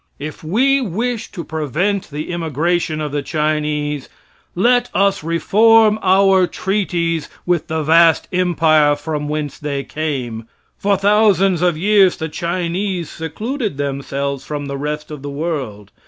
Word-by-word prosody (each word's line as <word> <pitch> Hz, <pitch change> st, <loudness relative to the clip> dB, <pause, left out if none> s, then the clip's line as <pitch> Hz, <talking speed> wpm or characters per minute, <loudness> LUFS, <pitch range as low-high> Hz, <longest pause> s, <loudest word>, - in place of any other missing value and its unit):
If 150 Hz, +3 st, -7 dB
we 265 Hz, -, +2 dB
wish 230 Hz, +2 st, -3 dB
to 175 Hz, -, -6 dB
prevent 160 Hz, -, -2 dB
the 150 Hz, +3 st, -5 dB
immigration 165 Hz, 0 st, -1 dB
of 150 Hz, -2 st, -3 dB
the 145 Hz, 0 st, -1 dB
Chinese, 150 Hz, -1 st, -2 dB, 0.5 s
let 245 Hz, +6 st, +3 dB
us 195 Hz, -2 st, +2 dB
reform 215 Hz, +6 st, +4 dB
our 190 Hz, -1 st, +4 dB
treaties 175 Hz, -6 st, -1 dB, 0.2 s
with 175 Hz, -3 st, 0 dB
the 160 Hz, -1 st, -2 dB
vast 165 Hz, +1 st, +4 dB
empire 160 Hz, -5 st, +3 dB
from 150 Hz, 0 st, -4 dB
whence 150 Hz, -2 st, -3 dB
they 140 Hz, -2 st, -3 dB
came. 130 Hz, -8 st, -4 dB, 0.3 s
For 200 Hz, 0 st, +2 dB
thousands 195 Hz, -3 st, +3 dB
of 175 Hz, -3 st, +2 dB
years 195 Hz, +1 st, +4 dB
the 160 Hz, 0 st, -4 dB
Chinese 175 Hz, +2 st, -2 dB
secluded 210 Hz, -, -4 dB
themselves 140 Hz, -1 st, -3 dB
from 145 Hz, 0 st, -5 dB
the 140 Hz, 0 st, -4 dB
rest 150 Hz, +2 st, -4 dB
of 150 Hz, -2 st, -7 dB
the 145 Hz, -, -6 dB
world. 140 Hz, -, -4 dB
165 Hz, 140 wpm, -18 LUFS, 150-195 Hz, 0.5 s, reform